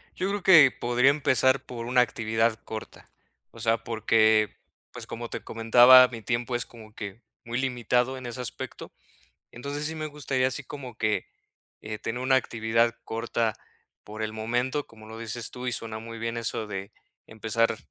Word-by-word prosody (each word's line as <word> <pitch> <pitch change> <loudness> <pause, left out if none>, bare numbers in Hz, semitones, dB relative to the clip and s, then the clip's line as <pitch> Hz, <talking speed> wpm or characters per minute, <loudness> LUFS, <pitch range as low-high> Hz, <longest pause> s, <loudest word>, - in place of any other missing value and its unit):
yo 185 +1 -1
creo 200 -1 -3
que 160 -8 +8
podría 120 +3 +2
empezar 130 -2 +2
por 115 -2 -6
una 125 0 +4
actividad 115 -1 +1
corta. 110 0 -9 0.4
O - - -14
sea, 115 0 +1
porque, 110 -1 +3 0.4
pues, - - -8
como 120 0 -6
te - - -6
comentaba, 120 +3 +7
mi 115 -2 -8
tiempo 120 +2 -2
es 120 - -1
como 110 -2 -14
que 100 +1 -7 0.2
muy 115 +1 -4
limitado 125 0 0
en 130 - -9
ese 120 +1 -6
aspecto. 125 - -7 0.6
Entonces, 140 +4 -5
sí 160 - -3
me 155 -1 -4
gustaría 140 -3 -1
así 130 +2 -3
como 130 -4 -9
que, 110 -1 0 0.6
eh, 105 0 -5
tener 120 +4 -4
una 130 0 +4
actividad 115 -1 +1
corta 115 -1 -1 0.5
por 110 +1 -7
el 110 0 -2
momento, 120 +6 -1
como 110 -1 -15
lo 110 +1 -9
dices 115 +1 -4
tú 125 0 -7
y 125 - -1
suena 110 -1 -3
muy 115 0 -8
bien 115 +1 -3
eso 115 -1 -2
de 100 0 -6 0.3
empezar 110 +1 0
115 Hz, 175 wpm, -27 LUFS, 110-130 Hz, 0.6 s, que